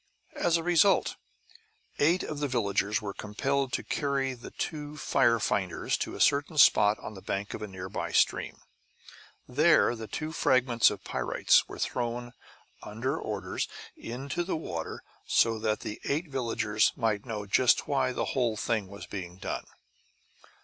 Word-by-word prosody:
As 170 -1 +3
a 165 - -4
result, 175 +2 +3 0.8
eight 170 +5 +3
of 150 - -5
the 145 - 0
villagers 105 -3 0
were 100 -1 -4
compelled 135 +7 -1
to - - -1
carry 140 -2 -1
the 120 -1 -10
two 150 -2 -5
fire 120 -5 +3
finders 95 -3 0
to - - -4
a - - -8
certain 145 +3 +2
spot 105 -6 +6
on - - -8
the 95 - -10
bank 100 +2 -3
of - - -6
a 105 - -4
nearby 95 0 -5
stream. - - +1 0.9
Here 150 -1 +4
the 110 -1 -7
two 155 +6 -4
fragments 130 -6 +3
of 100 -2 -7
pyrites - - +2
were - - -9
thrown, 120 0 -3 0.5
under 125 +7 -3
orders, 95 -4 -3 0.3
into 135 +7 -4
the 180 -2 -2
water; 85 - -5 0.2
so 115 -1 +3
that 110 -1 -1
the 105 - -6
eight 155 +4 -1
villagers 110 -5 +1
might 110 -3 -1
know 105 -3 -4
just 120 +5 +3
why 140 -2 +1
the - - -2
whole 120 -4 +1
thing 110 -2 -1
was 100 +1 -9
being 90 -3 -7
done. 95 - -5
120 Hz, 155 wpm, -29 LUFS, 105-140 Hz, 0.9 s, spot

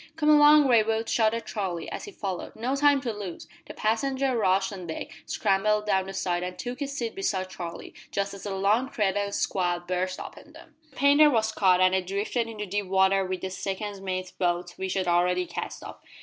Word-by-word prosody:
"Come 305 -2 +1
along, 295 -1 +7
Raywood," 225 -2 +2
shouted 230 0 +1
Charlie, 185 -6 -3
as - - -5
he 410 - -9
followed. 190 - -5
"No 245 +5 -1
time 285 -1 +4
to 240 -4 -3
lose!" 200 -5 -7 0.2
The - - -9
passenger 260 +4 0
rushed 190 -2 +2
on 185 -3 -8
deck, 160 - -6 0.2
scrambled 210 +1 +1
down 190 -2 +1
the 195 - -6
side, 175 -2 -1
and 180 0 -5
took 250 +1 -5
his 285 -1 -3
seat 230 -4 -3
beside 190 -1 -2
Charlie, 170 -2 -7 0.2
just 200 0 -2
as 200 - -9
the 200 -2 -4
long 210 +7 +2
threatened 205 -4 -1
squall 175 -2 0
burst 185 +1 -2
upon - - -10
them. - - -15 0.2
The 270 - -24
painter 285 +2 +6
was 220 -4 +1
cut, 185 -4 +3
and 185 0 +5
they 190 - +2
drifted 200 +5 -2
into 215 -2 -5
deep 200 0 -3
water 190 +1 +3
with 185 -1 -4
the 190 - -4
second 195 +1 -4
mate's 185 -1 -3
boat, 175 -1 -1
which 190 0 -3
had 190 -2 -1
already 180 +1 +2
cast - - -6
off. - - -9
200 Hz, 205 wpm, -27 LUFS, 185-230 Hz, 0.2 s, along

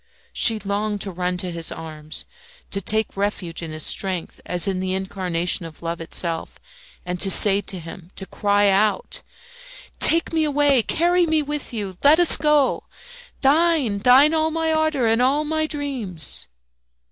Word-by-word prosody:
She 225 -2 +4
longed 205 +1 -3
to 195 - -4
run 180 0 -3
to 180 -1 -2
his 165 -1 -4
arms, 155 -1 -7 0.5
to 195 - -2
take 220 +3 0
refuge 195 -4 -3
in 165 - -6
his 155 -1 -4
strength, 185 -4 -2
as 180 +2 -1
in 190 -1 -1
the 185 0 -2
incarnation 185 -2 -1
of 165 0 -11
love 165 0 -4
itself, 165 0 -4 0.5
and 180 0 -4
to 195 - +3
say 200 +1 +6
to 200 -2 -5
him, 170 +1 -11
to 195 - -5
cry 205 +2 +1
out, 215 - 0 0.8
"Take 330 0 +3
me 320 -1 +1
away! 290 -3 +2
carry 345 +7 +1
me 315 -1 +1
with 295 0 -5
you! 200 -6 -6
let 290 +2 +6
us 350 - +8
go! 300 -2 +1 0.6
Thine, 285 -6 +2
thine! 260 +8 +5
all 315 0 +1
my 320 0 -1
ardour 315 -5 0
and 225 +1 +2
all 275 +4 +2
my 315 +1 -1
dreams!" 260 - -3
210 Hz, 165 wpm, -21 LUFS, 180-295 Hz, 0.8 s, us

